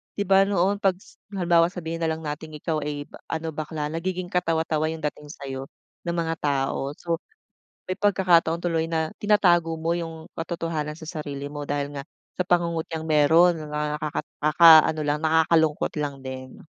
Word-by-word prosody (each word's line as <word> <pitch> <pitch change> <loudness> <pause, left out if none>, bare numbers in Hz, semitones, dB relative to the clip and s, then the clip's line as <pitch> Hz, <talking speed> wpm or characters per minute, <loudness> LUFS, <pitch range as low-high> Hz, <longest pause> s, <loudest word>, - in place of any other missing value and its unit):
di 205 - -1
ba 195 0 +4
noon 200 +1 +1
'pag 195 -3 +2
s 190 - -20 0.2
halimbawa 170 -2 +4
sabihin 165 -2 -5
na 165 - 0
lang 160 0 -3
nating 155 +1 -6
ikaw 155 +1 -2
ay 145 0 -4 0.2
ano, 160 0 -3
bakla. 150 0 -4
Nagiging 180 +2 -3
katawa-tawa 160 -3 0
yung 160 -1 -5
dating 150 0 -4
sa'yo 135 -2 -7 0.4
ng 170 - -1
mga 165 -1 -1
tao. 140 0 -1
So, 170 -1 -3 0.7
may 185 - -2
pagkakataon 175 -4 +3
tuloy 165 -2 0
na 160 -1 -1
tinatago 175 -6 +3
mo 160 +1 -2
yung 165 -2 -4
katotohanan 165 -2 -3
sa 160 0 -8
sarili 145 -1 -5
mo 145 -1 -6
dahil 145 0 -3
nga 140 - -7 0.3
sa 180 - 0
pangungutyang 165 -2 0
meron. 160 +3 +4
Mga 150 0 -3
nakaka 150 -1 -2 0.2
nakakaano 155 0 +7
lang, 145 0 0
nakakalungkot 160 0 +2
lang 145 -1 -2
din. 130 0 -8
160 Hz, 165 wpm, -25 LUFS, 150-170 Hz, 0.7 s, nakakaano